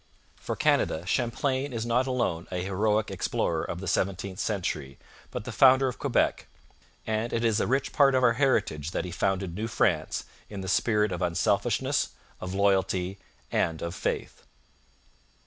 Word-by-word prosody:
For -, -, -5 dB
Canada 80 Hz, +2 st, +1 dB
Champlain 130 Hz, +6 st, 0 dB
is 115 Hz, -2 st, -3 dB
not 125 Hz, +3 st, +1 dB
alone 120 Hz, -10 st, -1 dB
a 90 Hz, -1 st, -2 dB
heroic 105 Hz, +3 st, 0 dB
explorer 80 Hz, -2 st, -1 dB
of 90 Hz, -, -5 dB
the 95 Hz, -, -5 dB
seventeenth 95 Hz, 0 st, -1 dB
century, 85 Hz, -9 st, -2 dB, 0.3 s
but -, -, -5 dB
the -, -, -6 dB
founder 130 Hz, 0 st, +6 dB
of 125 Hz, -, -4 dB
Quebec; -, -, +1 dB, 0.6 s
and 110 Hz, +2 st, -1 dB
it 115 Hz, 0 st, 0 dB
is 115 Hz, -1 st, +2 dB
a -, -, 0 dB
rich 135 Hz, +2 st, 0 dB
part 140 Hz, -2 st, +5 dB
of 130 Hz, -, +2 dB
our 120 Hz, -1 st, +5 dB
heritage 110 Hz, -, +1 dB
that -, -, -1 dB
he 90 Hz, -, -6 dB
founded 95 Hz, 0 st, -1 dB
New 105 Hz, +5 st, -3 dB
France -, -, 0 dB, 0.3 s
in 100 Hz, -2 st, -6 dB
the 95 Hz, -, -6 dB
spirit 105 Hz, +1 st, +2 dB
of 90 Hz, -, -3 dB
unselfishness, 85 Hz, -2 st, +1 dB, 0.3 s
of 90 Hz, +1 st, -5 dB
loyalty, 95 Hz, -1 st, +1 dB, 0.3 s
and 80 Hz, -1 st, 0 dB
of 85 Hz, 0 st, -3 dB
faith. -, -, -3 dB
100 Hz, 165 wpm, -27 LUFS, 90-120 Hz, 0.6 s, founder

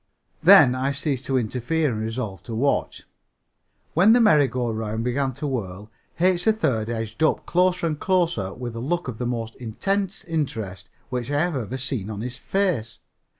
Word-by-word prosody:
Then, 125 Hz, -, +8 dB
I 130 Hz, +2 st, -1 dB
ceased 140 Hz, -2 st, -2 dB
to 135 Hz, -, +1 dB
interfere 130 Hz, +6 st, 0 dB
and 110 Hz, -1 st, -3 dB
resolved 110 Hz, -5 st, -4 dB
to 115 Hz, -, -4 dB
watch. 140 Hz, +5 st, 0 dB, 0.9 s
When 190 Hz, +7 st, +6 dB
the 245 Hz, -, +5 dB
merry 155 Hz, -, +5 dB
go 120 Hz, -1 st, -2 dB
round 110 Hz, 0 st, -3 dB
began 130 Hz, +2 st, 0 dB
to 150 Hz, -, -6 dB
whirl 105 Hz, -6 st, -4 dB, 0.3 s
H. 180 Hz, 0 st, +2 dB
3rd 135 Hz, -, +1 dB
edged 110 Hz, 0 st, -4 dB
up 155 Hz, -, +2 dB
closer 180 Hz, 0 st, +2 dB
and 155 Hz, -3 st, -1 dB
closer 170 Hz, -, +1 dB
with 120 Hz, 0 st, -6 dB
a -, -, -4 dB
look 170 Hz, +7 st, -2 dB
of 120 Hz, -3 st, -6 dB
the 125 Hz, -, -1 dB
most 115 Hz, -2 st, -3 dB
intense 195 Hz, -, -2 dB
interest 115 Hz, -, -4 dB, 0.2 s
which 125 Hz, -1 st, -3 dB
I 145 Hz, 0 st, +1 dB
have 175 Hz, -2 st, 0 dB
ever 125 Hz, 0 st, -3 dB
seen 125 Hz, -6 st, -3 dB
on 105 Hz, -1 st, -5 dB
his 125 Hz, +2 st, -4 dB
face. 160 Hz, -, -1 dB
130 Hz, 180 wpm, -24 LUFS, 115-160 Hz, 0.9 s, Then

